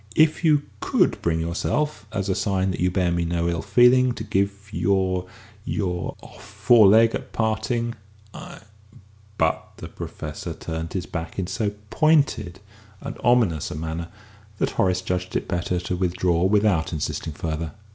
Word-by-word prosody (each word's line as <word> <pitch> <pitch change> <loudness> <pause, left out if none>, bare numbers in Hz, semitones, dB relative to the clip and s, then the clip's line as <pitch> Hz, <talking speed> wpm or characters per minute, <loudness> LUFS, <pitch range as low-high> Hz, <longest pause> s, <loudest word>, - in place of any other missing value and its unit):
If 155 +2 +3
you 150 -3 +4 0.2
could - - +1
bring 80 -1 0
yourself, 105 - -2
as 100 -2 -2
a 95 - +1
sign 95 -1 0
that - - -5
you 90 - +2
bear 90 -1 +1
me 85 0 0
no 85 0 -1
ill 85 -1 -1
feeling, 125 +5 +5
to 110 - -6
give 100 -2 +1 0.2
me - - -3
your 95 -2 +1 0.4
your 90 -3 -2
off - - -14
foreleg 115 -1 +5
at - - -6
parting, 115 +2 -1 0.4
I - - -10 0.4
" 105 +1 -28
But 80 0 0
the - - -8
Professor - - -7
turned 80 0 -5
his 90 -2 -2
back 85 -1 -6
in 95 - -1
so 105 +2 -2 0.2
pointed 145 - +2 0.4
and - - -6
ominous 115 -11 +3
a - - -6
manner 80 +2 -4 0.5
that - - 0
Horace 90 -1 +1
judged 90 0 -3
it - - -1
better 90 0 -1
to 90 +1 -3
withdraw 90 -1 +1
without 100 -5 +2
insisting 80 0 -3
further. 80 +1 -4
95 Hz, 165 wpm, -24 LUFS, 85-110 Hz, 0.5 s, feeling